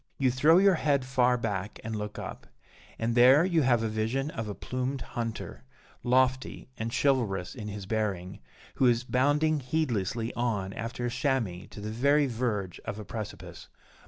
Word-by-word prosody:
You 130 -2 +2
throw 150 +7 +5
your 195 +1 +6
head 140 -3 +2
far 125 -1 +3
back 105 -3 -3
and 110 0 -4
look 105 0 -5
up; - - -7 0.5
and 115 +1 -1
there 130 +7 +7
you 170 -4 +2
have 120 -4 +3
a - - +1
vision 115 +7 -1
of 115 -1 -4
a 100 - -4
plumed 130 +2 -3
hunter, 115 - -4 0.4
lofty 130 +1 +1
and 115 +1 -4
chivalrous 115 -10 +1
in 110 -5 -7
his 105 -1 -6
bearing, 100 -3 -2 0.4
who 130 - +4
is 120 0 +3
bounding 145 +5 +2
heedlessly 120 - -1
on 105 -6 -1
after 120 +2 -4
a 120 - -1
chamois 120 -9 -1
to - - -10
the 105 +1 -5
very 140 +6 +3
verge 110 -7 -2
of 110 -2 -5
a 105 - -7
precipice. 110 0 -7
120 Hz, 170 wpm, -29 LUFS, 110-130 Hz, 0.5 s, there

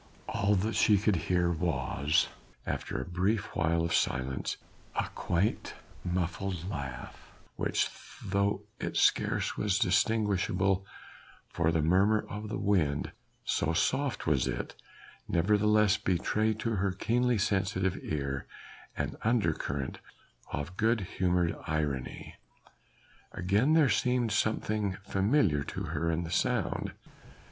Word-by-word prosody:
All 100 +1 +1
that 105 +4 0
she 105 -2 +4
could 105 0 +2
hear 90 +1 +1
was 75 -3 +1 0.4
after - - -3
a - - -4
brief 95 +4 -1
while 85 0 +2
of 85 - -1
silence 65 +1 0 0.4
a - - 0
quaint 90 +5 -1 0.3
muffled 90 0 -2
laugh 70 -9 -6 0.3
which - - +1 0.4
though 100 +1 0 0.2
it - - -3
scarce - - +2
was 100 -3 +1
distinguishable 95 -1 +2 0.6
from 85 -1 +1
the 80 -2 +2
murmur 95 +6 +3
of 105 +1 -6
the - - -2
wind, 80 -8 +1 0.3
so 80 - +1
soft 135 +9 0
was 70 -6 +2
it, - - -3 0.5
nevertheless 105 +3 +3
betrayed 105 +4 0
to 115 -2 0
her 95 +1 +1
keenly 120 +5 +1
sensitive 95 -2 +1
ear 70 -3 -3 0.5
an - - -2
undercurrent 80 - 0 0.5
of 80 +5 -4
good 110 0 +2
humoured 90 -2 0
irony. 75 -5 -3 1.0
Again 100 - +2
there 160 -3 +6
seemed 125 -2 +1
something 105 -3 0
familiar 95 - +2
to - - -5
her 80 +1 -1
in 85 +1 0
the 80 - -6
sound. - - 0
95 Hz, 120 wpm, -30 LUFS, 85-105 Hz, 1.0 s, there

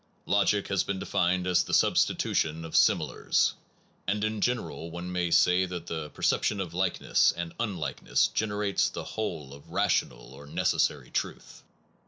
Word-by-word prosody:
Logic 100 0 +2
has 100 -2 +1
been 100 - -3
defined 90 0 0
as 90 -1 +3
the - - 0
substitution 80 +1 +1
of 80 - -7
similars; - - +2 0.5
and 105 +2 0
in 110 -1 -1
general 120 -8 -2
one 85 +2 -6
may 90 -1 0
say 90 +2 +4
that 90 -2 -6
the 80 -3 -5
perception 105 - 0
of 90 -4 -4
likeness 90 0 +2
and 85 -1 -4
unlikeness 100 -9 0
generates 105 -2 0
the - - -6
whole 80 -11 -5
of 70 0 -14
ra - - +1
tional - - -1
or 70 +2 -12
necessary - - 0
truth. - - -4
90 Hz, 155 wpm, -28 LUFS, 80-100 Hz, 0.5 s, say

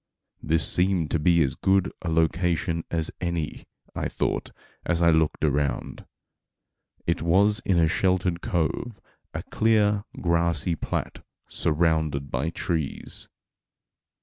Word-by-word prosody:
This 80 +1 +1
seemed 90 -3 +2
to 85 - +1
be 85 +1 +4
as 65 - 0
good 95 -1 +2
a 85 - -3
location 85 +1 +1
as 80 -2 -1
any, 85 -4 -3 0.3
I - - -2
thought, - - -2 0.3
as 85 -2 0
I 85 -1 +5
looked 80 -1 +2
around. 75 -1 -1 1.0
It 85 +1 0
was 100 +7 +3
in 95 -3 +2
a 80 -1 +4
sheltered 90 0 +1
cove, 100 - -2 0.4
a - - -3
clear, 105 -2 +2 0.2
grassy 85 0 +1
plat 80 - -4 0.2
surrounded 80 -3 0
by 65 +6 -1
trees. 80 -3 -3
85 Hz, 120 wpm, -25 LUFS, 80-90 Hz, 1.0 s, I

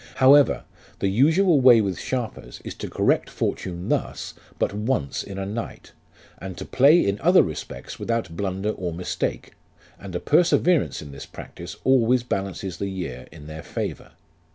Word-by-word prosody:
However, 140 +2 +5 0.3
the 100 - 0
usual 155 - +4
way 125 -3 +8
with 100 -4 -1
sharpers 125 -4 -4
is - - -5
to - - -7
correct - - +1
fortune 90 -1 -3
thus - - -2 0.2
but - - 0
once 105 - -1
in 100 -1 -8
a 95 - -3
night, 110 +4 -6 0.5
and 95 -1 -7
to - - -6
play 145 +7 +5
in 100 +1 -1
other 180 +3 +6
respects 80 - -7
without 115 -8 -2
blunder 95 +2 -2
or 90 -5 -4
mistake, 90 +2 -3 0.5
and 95 -3 -8
a - - 0
perseverance 170 - +2
in 70 - -10
this 70 - -9
practice 85 0 -9
always 125 -2 +3
balances 95 -4 -3
the 100 - -3
year 85 -10 -6
in 75 -2 -12
their 80 +1 -8
favour. - - -5
100 Hz, 160 wpm, -24 LUFS, 90-130 Hz, 0.5 s, way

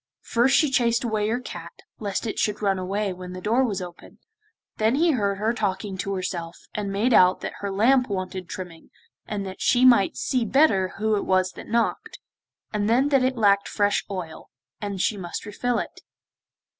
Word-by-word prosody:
First 245 +3 +2
she 300 -4 +3
chased 235 -2 +2
away 215 -2 0
her 235 +2 0
cat, 255 - -8 0.3
lest 205 +1 -3
it 220 - -3
should 210 0 -1
run 195 -2 +1
away 195 +2 -2
when 180 0 -8
the 185 - -6
door 230 +7 +2
was 200 -7 -1
opened, 175 -1 -12 0.6
then 220 +3 +2
he 330 +3 +3
heard 200 -7 0
her 220 +3 0
talking 200 -3 -2
to 195 0 -2
herself 175 -2 -4 0.2
and 205 -2 -3
made 220 +6 +1
out 185 -3 +5
that - - -4
her 200 - -3
lamp 245 +6 +3
wanted 185 -2 -4
trimming, 175 -3 -8 0.4
that 195 -3 -5
she 250 +1 +4
might 235 -6 +5
see 255 -2 0
better 210 -7 +3
who 215 +1 +1
it - - -2
was 185 0 +2
that - - -11
knocked, 230 +1 -1 0.6
and 210 0 0
then 260 +5 +3
that 275 -2 +4
it 255 0 0
lacked 200 -2 +3
fresh 205 -1 +1
oil, 180 -5 -6 0.3
and 200 -2 -4
she 205 +3 +1
must 175 -3 -6
refill 235 +4 -1
it. - - -5
205 Hz, 190 wpm, -24 LUFS, 190-235 Hz, 0.6 s, out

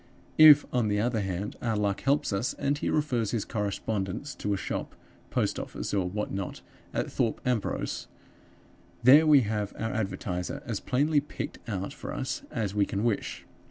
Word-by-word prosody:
If, 150 -2 +10
on 120 -3 +2
the 105 0 +1
other 115 0 +1
hand, 95 +1 -3
our 115 -3 0
luck 100 -1 0
helps 140 -5 +1
us, 100 +6 -1
and 140 0 0
he 145 - -2
refers 125 -8 +1
his 110 -2 -1
correspondents 105 +3 -3
to 105 - -3
a 100 - +1
shop, - - -4 0.3
post - - 0
office, - - -5
or 95 -3 +1
what 105 +3 -3
not 95 -1 -4 0.3
at - - -2
Thorpe 115 - 0
Ambrose, 125 -5 -1 1.0
there 145 +6 +8
we 145 -3 +7
have 105 -2 -2
our 115 0 -2
advertiser 100 +3 -3
as 115 -6 -2
plainly 145 +4 +2
picked 145 - -6
out 100 -2 -3
for - - -7
us - - -3
as 105 -4 -2
we 105 -1 +2
can 100 +2 -2
wish. 115 -4 -1
110 Hz, 175 wpm, -28 LUFS, 100-130 Hz, 1.0 s, If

